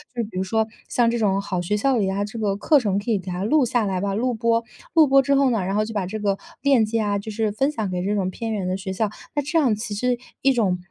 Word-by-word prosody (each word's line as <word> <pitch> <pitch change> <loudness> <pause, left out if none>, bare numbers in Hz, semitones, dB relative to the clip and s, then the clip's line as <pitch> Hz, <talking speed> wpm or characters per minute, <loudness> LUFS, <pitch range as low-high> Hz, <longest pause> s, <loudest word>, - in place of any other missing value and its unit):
就 235 - -1
比 210 - -7
如 185 - 0
说 220 +3 +1 0.2
像 240 -1 +2
这 235 - -1
种 200 -2 +2
好 185 -3 -3
学 175 +4 -1
校 255 +5 +2
里 210 - +1
呀， 195 +1 -1
这 215 +3 -6
个 205 -2 0
课 290 +9 +4
程 205 -6 0
可 210 +3 -3
以 210 - +2
给 185 0 -8
它 180 +2 -3
录 280 +6 +3
下 240 -1 +1
来 190 -2 -1
吧 200 +1 -1
录 245 +5 0
播， 230 +1 +1 0.3
录 320 -3 +6
播 275 0 +6
之 280 +1 +2
后 275 -1 +4
呢， 230 -3 +1
然 190 +1 -2
后 215 - +2
就 225 +1 -6
把 200 -3 -1
这 200 +4 -4
个 200 -1 0 0.2
链 270 -6 +4
接 225 +1 -1
啊， 205 -1 0
就 200 - -7
是 215 0 -1
分 270 +7 +1
享 220 -9 -3
给 180 -1 -2
这 200 +3 0
种 190 -2 0
偏 225 +2 -4
远 200 -3 -2
的 185 +1 -1
学 190 0 -5
校， 215 +2 0 0.3
那 290 - +2
这 300 +4 +1
样 255 -8 +3
其 215 0 -5
实 245 +4 0 0.2
一 270 - +4
种 200 -7 +1
215 Hz, 325 characters per minute, -23 LUFS, 200-245 Hz, 0.3 s, 录